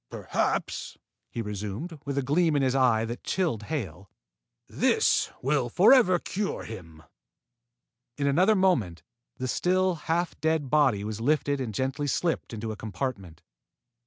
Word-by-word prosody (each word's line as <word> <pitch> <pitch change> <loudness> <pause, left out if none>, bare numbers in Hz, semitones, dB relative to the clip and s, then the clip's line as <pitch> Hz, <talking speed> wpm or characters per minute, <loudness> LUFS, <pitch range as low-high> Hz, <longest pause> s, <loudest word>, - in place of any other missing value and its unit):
"Perhaps," - - -2 0.3
he 115 - -4
resumed, 105 - -5
with 140 0 -3
a 140 - +1
gleam 155 +4 +2
in 140 - +2
his 130 -1 +2
eyes 120 -4 +3
that 120 +1 -6
chilled 170 - -1
Hale, 95 - -5 0.6
"this - - +2
will 135 -2 +1
forever 190 - +5
cure 200 +3 -3
him." 80 -8 -10 1.1
In 145 - -1
another 180 +10 +4
moment, 120 - +1 0.3
the 130 - -3
still, 185 +6 +1 0.2
half 170 +1 0
dead 160 -4 0
body 135 -9 +3
was 110 +1 -5
lifted 145 +1 +1
and 120 -4 -3
gently 135 +6 -2
slipped 165 +4 -1
into 110 -1 -4
a - - -5
compartment. 100 - -5
135 Hz, 140 wpm, -27 LUFS, 110-160 Hz, 1.1 s, forever